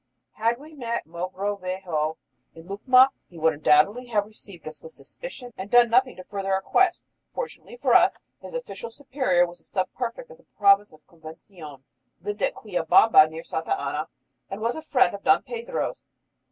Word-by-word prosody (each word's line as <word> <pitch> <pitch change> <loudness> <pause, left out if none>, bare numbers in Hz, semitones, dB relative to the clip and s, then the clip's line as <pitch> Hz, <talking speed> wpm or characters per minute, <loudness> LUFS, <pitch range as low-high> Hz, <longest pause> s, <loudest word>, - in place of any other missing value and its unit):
Had 230 +2 0
we 300 +2 -13
first 300 - -15
met 235 -1 -3
Mogrovejo 185 -2 -3 0.4
in 165 - -12
Lucma 255 +7 +5 0.2
he 175 - -15
would 160 0 +2
undoubtedly 155 +11 +3
have 210 -4 0
received 200 -6 -13
us 155 - -9
with 480 - -12
suspicion 265 - -10
and 190 +2 -7
done 240 0 +5
nothing 255 +2 +3
to 185 - -10
further 195 0 -4
our 190 - +1
quest. 370 - +2 0.3
Fortunately 485 0 -7
for - - +1
us, - - +5 0.2
his - - -9
official - - -6
superior 255 -8 +1
was 175 0 -11
the - - -26
sub 185 -2 -3
prefect 485 - -5
of 480 - -14
the - - -24
province 200 0 +4
of 155 -1 -20
Convención, 160 -3 -13 0.4
lived 205 0 -5
at - - 0
Quillabamba 180 -2 +4
near 160 +1 -8
Santa 160 - -2
Ana, 150 +3 -3 0.4
and 195 - -6
was 230 +2 -1
a 315 - -6
friend 260 -7 +2
of 200 - -8
Don 260 0 +4
Pedro's. 480 +1 -4
205 Hz, 180 wpm, -25 LUFS, 170-250 Hz, 0.4 s, Lucma